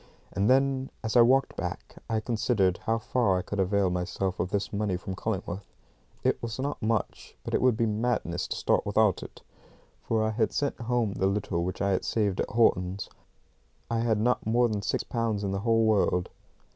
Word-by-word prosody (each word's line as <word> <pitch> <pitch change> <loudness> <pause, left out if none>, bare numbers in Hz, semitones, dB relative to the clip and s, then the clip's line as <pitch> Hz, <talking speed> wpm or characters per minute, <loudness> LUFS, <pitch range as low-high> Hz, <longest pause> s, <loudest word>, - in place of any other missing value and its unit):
And 100 +2 +1
then 135 0 +2
as 110 +1 -2
I 120 - +8
walked 130 +3 +4
back - - -6
I 110 -1 +1
considered 110 -5 +1
how 115 0 +2
far 115 -4 +1
I 90 - -2
could 100 +2 -5
avail 95 0 +2
myself 90 +1 -2
of 90 +1 -1
this 100 +1 -2
money 100 -3 0
from 95 +1 -6
Cullingworth. 95 -2 -4 0.5
It - - +1
was 115 -1 -4
not 140 +1 -3
much, 110 -1 -2
but - - -6
it - - +2
would 125 -3 +3
be 115 - +2
madness 105 -5 -1
to - - -3
start - - +1
without - - +2
it, - - -11 0.6
for 110 -1 0
I 110 - +1
had 110 0 0
sent 140 -4 -1
home 115 -3 0
the 95 - +1
little 95 -3 -1
which 90 +2 -3
I 100 - +2
had 95 - 0
saved 100 -4 0
at - - -3
Horton's. 95 -4 +1 0.8
I 115 - +1
had 115 -2 +1
not 125 +3 +1
more 120 +3 +3
than 105 -3 -2
six - - -1
pounds 115 -3 -2
in 100 - -1
the 100 - -1
whole 115 +1 +2
world. 95 -4 +2
110 Hz, 200 wpm, -28 LUFS, 95-115 Hz, 0.8 s, I